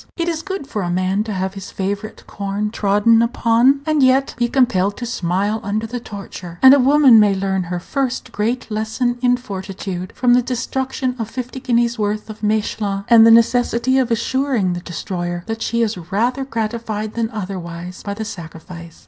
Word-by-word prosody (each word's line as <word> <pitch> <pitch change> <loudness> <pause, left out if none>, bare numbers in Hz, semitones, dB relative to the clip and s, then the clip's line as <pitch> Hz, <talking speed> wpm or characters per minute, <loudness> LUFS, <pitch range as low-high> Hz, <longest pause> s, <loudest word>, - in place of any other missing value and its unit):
It 340 -1 -1
is 325 -2 -1
good 385 -4 -5
for 215 -6 -4
a 175 - -2
man 185 +3 0
to 220 - -4
have 190 -1 -2
his 195 -1 -8
favorite 200 +3 -4
corn 200 +1 -3
trodden 210 +2 +3
upon, 235 +3 +3
and 310 -2 +1
yet 265 +1 +3
be 240 0 0
compelled 205 -6 +1
to 245 - -5
smile 200 0 -1
under 215 +2 -2
the 245 +2 -5
torture; 195 -5 -9
and 265 0 +10
a 280 - +5
woman 270 -3 +6
may 205 -2 +4
learn 190 -1 -1
her 175 +1 -3
first 255 +4 -3
great 230 +2 -2
lesson 220 +3 -1
in 245 -1 +3
fortitude 190 -5 -6
from 245 -1 +3
the 250 - +5
destruction 255 +1 -2
of 225 -1 -3
fifty 255 +2 -6
guineas' 235 -1 0
worth 210 +1 -2
of 215 - -12
Mechlin, 210 -2 -1
and 230 -1 +8
the - - +7
necessity 235 +2 +3
of 255 -2 0
assuring 235 -4 0
the 175 - -4
destroyer 175 0 -5
that 225 0 -5
she 235 0 0
is 225 -1 -1 0.2
rather 245 +7 0
gratified 220 -3 -3
than 230 -1 -1
otherwise 185 -4 -6
by 200 -1 -5
the 220 +1 -5
sacrifice. 170 -3 -10
220 Hz, 185 wpm, -19 LUFS, 195-245 Hz, 0.2 s, and